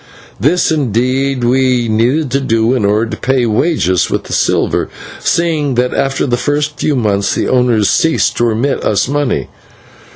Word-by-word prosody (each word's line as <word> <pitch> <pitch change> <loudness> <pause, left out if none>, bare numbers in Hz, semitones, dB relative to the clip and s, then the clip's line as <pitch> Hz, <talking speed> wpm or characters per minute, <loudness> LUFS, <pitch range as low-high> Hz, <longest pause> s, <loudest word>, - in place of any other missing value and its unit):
This, 160 - +2
indeed, 130 -1 0
we 125 -1 +2
needed 125 +6 0
to 140 - +1
do 115 -2 +1
in 125 -6 0
order 105 +3 +2
to - - -4
pay 130 -1 0
wages 110 - +1
with - - -2
the - - -7
silver, - - 0 0.3
seeing 155 -5 0
that 125 +1 0
after 135 0 0
the 120 -3 0
first 145 +2 -2
few 150 - 0
months 100 -5 0
the - - -1
owners 125 -5 +2
ceased 160 - +1
to 120 - +2
remit 120 +5 -1
us 105 +1 +1
money. 145 -2 -1
125 Hz, 165 wpm, -14 LUFS, 115-145 Hz, 0.3 s, This